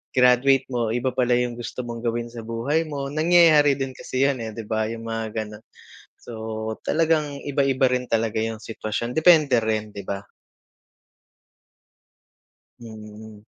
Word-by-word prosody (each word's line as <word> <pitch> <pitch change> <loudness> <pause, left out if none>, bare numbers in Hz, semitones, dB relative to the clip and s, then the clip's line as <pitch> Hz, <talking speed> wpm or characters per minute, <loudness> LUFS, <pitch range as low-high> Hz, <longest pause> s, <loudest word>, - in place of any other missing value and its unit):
graduate 125 +1 +4
mo 120 -2 0
iba 125 +1 0
pala 125 -1 +1
yung 125 -1 -1
gusto 125 +1 -5
mong 115 0 -6
gawin 120 0 -2
sa 115 -1 -8
buhay 115 +8 -1
mo, 140 -2 -4
nangyayari 155 -2 +5
din 135 -1 -2
kasi 130 +1 -2
yun, 140 -2 -1
eh, 110 - -5
'di 115 - -6
ba? 110 0 -1
Yung 115 0 -6
mga 115 0 -3
ganun. 105 0 -5 0.6
So - - -11 0.5
talagang 155 -3 +1
iba-iba 135 -2 +1
rin 125 0 -1
talaga 115 -1 0
yung 110 -1 -3
sitwasyon, 115 +2 -4
depende 155 -6 +5
rin, 110 -1 -1
'di 100 - -6
ba? 100 0 -5 2.5
Hmm. 110 -1 -11
120 Hz, 145 wpm, -23 LUFS, 110-140 Hz, 2.5 s, nangyayari